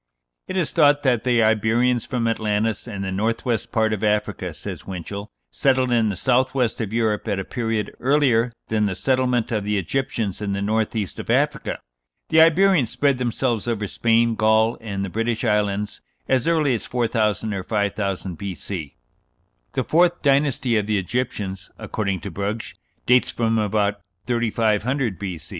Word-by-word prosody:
"It 185 - -3
is 175 - 0
thought 145 -3 +4
that 125 -5 +2
the 120 -3 +3
Iberians 110 +3 +2
from 120 -2 -1
Atlantis 110 0 -1
and 100 -4 -5
the 95 - -3
north 110 +4 -1
west 115 -5 -1
part 110 -1 +1
of 105 0 -4
Africa," 105 -3 0
says 80 +2 -8
Winchell, 100 +2 -6 0.2
"settled 130 -2 +2
in 115 -2 +3
the 100 - -2
south 130 +7 +1
west 120 -3 0
of 110 -3 -3
Europe 110 -2 0
at 100 -2 0
a 95 - -3
period 115 -3 -2
earlier 125 -4 +3 0.2
than 105 -1 +1
the 95 - -2
settlement 125 -2 +1
of 105 -3 0
the 105 0 0
Egyptians 105 0 -2
in 100 -1 -2
the 100 - -2
north 110 +2 0
east 100 -9 -3
of - - -7
Africa. - - +1 0.5
The 160 - +6
Iberians 165 - +4
spread 140 0 +1
themselves 120 -2 -1
over 110 -3 -1
Spain, 115 +2 +2
Gaul, 110 +1 +3
and 100 -3 -3
the - - -5
British 115 +1 -1
Islands 105 -1 0 0.3
as 130 0 +1
early 155 -5 +3
as 115 - -3
4000 110 -3 0
or 95 - -3
5000 100 -3 -2
B.C.... 95 -5 -6 0.8
The - - 0
fourth 175 +2 +2
dynasty 135 -4 +2
(of 105 -1 -1
the 105 -1 +1
Egyptians), 100 -2 -3
according 100 -4 -3
to 100 - -6
Brugsch, 100 +5 -4 0.3
dates 125 0 +4
from 115 -1 0
about 105 -1 0 0.2
3500 115 0 0
B. 95 -5 -4
110 Hz, 170 wpm, -22 LUFS, 100-125 Hz, 0.8 s, The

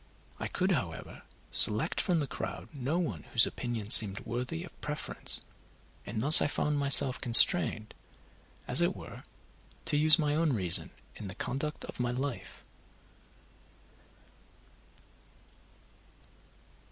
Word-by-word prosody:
I - - -5
could, 185 +1 -3
however, 95 - -6 0.3
select 105 +1 +3
from 175 -4 -2
the - - -4
crowd - - -9
no 140 +3 -5
one 175 -3 -5
whose 120 0 +4
opinions 115 -3 -3
seemed 100 -2 +5
worthy 125 +8 -7
of 180 - -17
preference, 150 0 -5 0.7
and 110 +2 -6
thus 145 +7 +6
I - - 0
found 150 0 -3
myself 140 -2 +2
constrained, 115 - +5 0.7
as - - +3
it - - -1
were, - - -13 0.6
to 155 -2 -2
use 155 +2 +3
my 150 -3 -2
own 155 -1 -1
reason 90 -7 +3 0.3
in 105 - -10
the 95 - -11
conduct 150 +4 -7
of - - -13
my 120 0 -3
life. 130 +1 -7
135 Hz, 125 wpm, -28 LUFS, 115-155 Hz, 0.7 s, thus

